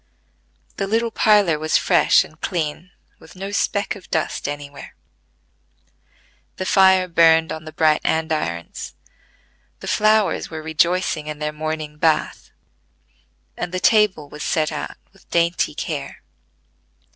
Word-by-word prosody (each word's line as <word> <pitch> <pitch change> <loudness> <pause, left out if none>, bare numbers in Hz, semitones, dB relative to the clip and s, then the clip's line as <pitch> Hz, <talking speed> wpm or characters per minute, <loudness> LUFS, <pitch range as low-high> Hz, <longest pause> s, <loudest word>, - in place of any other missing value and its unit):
The 195 - -2
little 230 +2 0
parlor 205 -8 +3
was 155 0 +2
fresh - - +4
and - - -17
clean, 170 -1 -3 0.3
with - - -16
no 195 +2 -6
speck 200 +1 -1
of 195 - -14
dust 160 - -2
anywhere; 145 -1 -8 1.6
the 185 - -4
fire 190 -1 +4
burned 165 -1 +4
on 155 0 -6
the 155 - -8
bright 155 0 +2
andirons; 155 - -2 0.8
the - - -9
flowers 215 -1 +2
were 160 -1 -7
rejoicing 160 0 0
in 150 -1 -5
their 150 0 -3
morning 155 -1 -5
bath; 160 -1 0 1.1
and 175 - -5
the 185 - -2
table 210 -8 +3
was 150 +1 -11
set 155 0 0
out 150 - -6 0.2
with 195 - -24
dainty 170 +1 +1
care. - - -5
160 Hz, 130 wpm, -21 LUFS, 155-190 Hz, 1.6 s, fresh